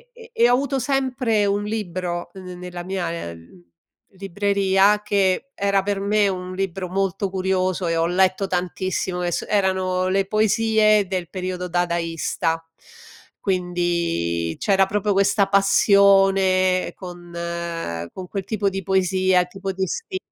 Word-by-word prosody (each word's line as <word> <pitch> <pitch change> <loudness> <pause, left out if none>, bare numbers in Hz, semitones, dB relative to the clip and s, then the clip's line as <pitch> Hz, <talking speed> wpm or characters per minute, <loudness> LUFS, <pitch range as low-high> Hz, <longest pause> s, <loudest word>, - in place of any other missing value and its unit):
e 470 0 -14
e 235 +1 +4
ho - - +5
avuto 270 +1 0
sempre 250 -5 0
un 200 +1 0
libro 180 -5 -4
n 190 - -10
ne 180 - -8
nella 180 -1 -7
mia, 170 - -3
uhm, 85 +2 -16 0.5
libreria 200 +1 +2
che 200 +6 0
era 200 -1 +1
per 200 0 -1
me 205 0 +2
un 185 -1 -4
libro 190 -1 -3
molto 195 0 -1
curioso 185 -1 -1
e 165 0 0
ho 165 - +2
letto 185 +2 +2
tantissimo 180 0 -2
che 175 0 -1
s - - -2
erano 185 -2 +1
le 195 0 +1
poesie 215 0 +3
del 180 -3 -4
periodo 185 -1 -4
dadaista. 170 -1 -1 0.8
Quindi 170 - -1
c'era 195 -1 +3
proprio 205 +1 0
questa 200 +1 +3
passione 195 -2 +4
con 175 -2 -10 0.8
con 185 -1 -8
quel 195 0 -4
tipo 200 0 -1
di 195 0 -4
poesia, 185 0 +2
il 180 - -1
tipo 195 +1 -5
di 190 0 -2
sti 375 - -4
190 Hz, 140 wpm, -22 LUFS, 180-200 Hz, 0.8 s, ho